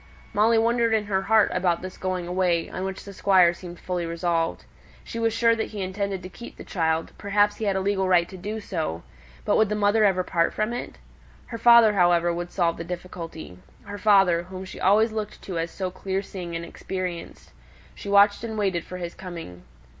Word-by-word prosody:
Molly 225 +2 +4
wondered 230 0 +2
in 215 -1 0
her 195 -2 0
heart 215 +1 +3
about 180 -2 0
this 185 0 -7
going 185 -2 -3
away, 175 -2 +1
on 185 - -4
which 190 0 -5
the 200 - -9
Squire 185 -3 +4
seemed 175 0 -10
fully 180 -1 -3
resolved. 165 0 -1 0.4
She 230 - -6
was 230 0 +1
sure 230 +1 +3
that 225 - -2
he 210 -2 -6
intended 190 0 -3
to - - -6
keep 235 +5 -11
the - - -9
child; 160 -2 -1
perhaps 205 +1 +2
he 220 - -3
had 200 -2 +1
a - - +1
legal 190 -1 0
right 175 -2 +4
to - - -10
do 210 +4 -5
so; 160 - -4 0.4
but 205 - +2
would 220 -2 +3
the 210 - -1
mother 210 +1 +3
ever 190 -3 +3
part 170 -2 0
from 215 +2 -1
it? 245 - -6 0.5
Her 230 - -7
father, 235 -2 +7
however, 175 -2 +3
would 175 +1 -4
solve 170 -3 0
the 165 - -5
difficulty, 170 - -8 0.2
her 205 0 -8
father, 195 -5 +4
whom 185 +1 -8
she 190 - -10
always 215 +4 +4
looked 215 -1 -5
to 180 -4 -4
as 165 +1 -2
so 185 0 -4
clear 190 +1 -3
seeing 180 -3 -7
and 165 0 -4
experienced. 180 -1 -6 0.4
She 200 - -8
watched 200 +1 +5
and 220 -1 -4
waited 190 -5 0
for 180 - -8
his 175 -1 -5
coming. 170 - -9
190 Hz, 210 wpm, -25 LUFS, 175-210 Hz, 0.5 s, father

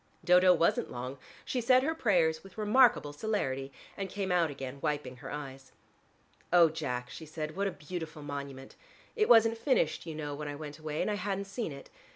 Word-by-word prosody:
Dodo 180 +1 +6
wasn't 170 -1 +2
long: 125 +2 -6 0.3
she 250 - -1
said 255 +2 +5
her 320 +3 +1
prayers 170 - +2
with 195 +1 -15
remarkable 215 - +4
celerity, 140 -8 -2 0.2
and 195 -1 -4
came 195 0 -3
out 175 -3 +3
again 135 -1 -7
wiping 145 -4 -2
her - - -9
eyes. 135 -2 -8 0.8
"Oh, 170 -2 +7
Jack," 125 -5 -4
she 160 - -9
said, 155 0 -5
"what 200 +1 0
a - - -1
beautiful 160 -2 -7
monument: 140 -2 -7 0.4
it 430 -2 +2
wasn't 225 0 +6
finished, 260 - +1
you 160 - -5
know, 150 -1 -4
when 150 +1 -5
I 145 - -4
went 150 0 -8
away 155 -1 -2
and - - -1
I 205 - -1
hadn't 200 0 -2
seen 200 -2 -4
it. 140 0 -11
160 Hz, 195 wpm, -31 LUFS, 145-200 Hz, 0.8 s, Oh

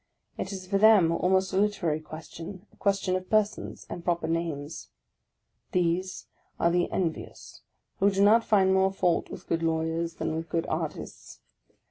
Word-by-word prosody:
It 190 - -4
is 190 -1 -6
for 195 +1 0
them 205 -6 +6
almost 190 +3 +1
a - - +1
literary 195 -7 +1
question, 165 +4 -9
a - - -21
question 195 -2 0
of 185 0 -4
persons, 215 -1 0
and 175 - -7
proper 170 -2 0
names; 165 -3 -3 0.8
these 180 0 0 0.3
are 170 - +3
the 175 0 +1
envious, 170 -4 -4 0.4
who 200 - +5
do 195 0 +2
not 225 +3 +6
find 190 -4 +3
more 190 0 +3
fault 180 -3 0
with - - -9
good 165 - -1
lawyers 165 +1 -1
than 160 - -2
with 165 +1 -5
good 165 -1 -1
artists. - - -5
180 Hz, 160 wpm, -27 LUFS, 165-195 Hz, 0.8 s, them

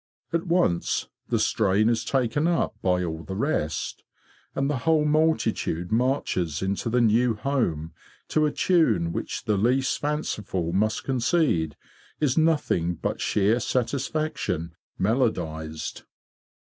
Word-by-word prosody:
At 170 +2 0
once 170 - +1 0.2
the - - +2
strain 105 +1 +2
is 115 -1 +1
taken 135 +5 +1
up 170 -1 +1
by 90 -1 +1
all 80 -2 -4
the 95 +3 -6
rest, 100 - -2 0.5
and 135 - 0
the 145 -1 0
whole 155 +4 +2
multitude 150 - +1
marches 110 - 0
into 100 +4 -1
the 120 +1 +2
new 115 +1 +3
home 105 - -1 0.4
to 155 -1 +3
a - - -1
tune 115 - +2
which - - -4
the 105 -2 +1
least 130 +6 +1
fanciful 105 - -2
must 110 +3 +1
concede 125 - +1 0.4
is 145 -5 +2
nothing 150 - +2
but - - -3
sheer 105 +4 +2
satisfaction 130 - -2 0.2
melodised. 80 - -1
115 Hz, 125 wpm, -25 LUFS, 90-145 Hz, 0.5 s, new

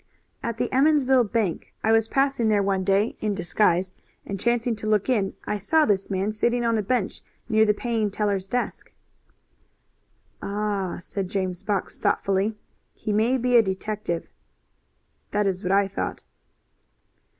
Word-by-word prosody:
"At 235 -1 -3
the 245 +1 0
Emmonsville 265 -3 +4
bank. 210 -5 -2
I 220 - +3
was 225 0 +4
passing 270 -3 +1
there 205 -2 +3
one 195 -1 0
day 200 +3 +2
in 210 -2 0
disguise 180 0 +1 0.3
and, 195 -1 -5
chancing 235 +1 +1
to 215 - -5
look 215 +2 +1
in, 205 -6 +1
I 210 - -2
saw 310 - +3
this 195 -2 +1
man 195 +2 0
sitting 235 +3 0
on 230 -1 +2
a 215 - +1
bench 210 0 -1 0.3
near 220 -2 +4
the 210 - +3
paying 225 -2 -1
teller's 200 -2 -1
desk." 245 +5 -3 1.5
"Ah!" 200 -2 -2
said 185 +1 -4
James 185 -2 -2
Fox, 200 -3 -2
thoughtfully. 200 +2 +1 0.4
"He 215 -1 -3
may 225 +5 +2
be 250 0 +1
a - - +8
detective." 190 -3 -3 1.0
"That 205 0 0
is 190 -1 -1
what 185 -2 -1
I 200 0 +4
thought." 195 - -4
210 Hz, 155 wpm, -25 LUFS, 195-235 Hz, 1.5 s, a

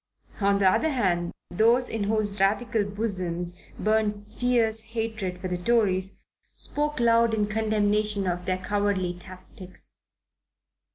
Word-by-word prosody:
On 200 -1 +3
the 195 -1 +3
other 315 +12 +3
hand, 180 - 0 0.2
those 230 +6 +3
in 215 -2 -2
whose 210 -1 0
Radical 215 +3 +2
bosoms 185 -4 -3 0.2
burned 215 -1 0
fierce 230 -3 +2
hatred 220 -5 -4
for 185 - -4
the 180 -1 -3
Tories, 195 -3 +1 0.3
spoke 295 -1 -2
loud 230 -1 +4
in 210 -1 +1
condemnation 210 -1 0
of 180 0 -2
their 185 0 +1
cowardly 195 -2 -1
tactics. 185 +1 -13
205 Hz, 125 wpm, -26 LUFS, 185-225 Hz, 0.3 s, loud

